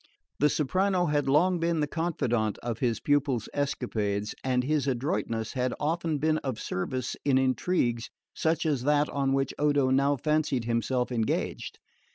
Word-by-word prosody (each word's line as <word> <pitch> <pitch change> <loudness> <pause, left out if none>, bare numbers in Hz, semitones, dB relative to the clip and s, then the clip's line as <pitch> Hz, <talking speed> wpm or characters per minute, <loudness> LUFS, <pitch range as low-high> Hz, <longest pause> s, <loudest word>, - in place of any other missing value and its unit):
The 150 - +4
soprano 185 +6 +1
had 145 -3 +1
long 175 +6 +3
been 165 -1 0
the 150 - +2
confidant 125 - -1
of 115 -1 -3
his 120 -3 0
pupil's 145 -5 +1
escapades, 110 -7 -1
and 125 -1 +1
his 145 +1 0
adroitness 120 - -1
had 125 -1 -1
often 160 +1 0
been 155 +2 +1
of 130 -5 -4
service 125 +7 -3
in 135 -2 +3
intrigues 130 -2 0 0.2
such 160 +1 0
as 145 -5 +1
that 145 0 +3
on 140 -1 0
which 135 0 0
Odo 145 -3 +2
now 140 +2 +3
fancied 150 -3 0
himself 125 +2 0
engaged. 115 -3 -2
140 Hz, 155 wpm, -28 LUFS, 125-150 Hz, 0.2 s, The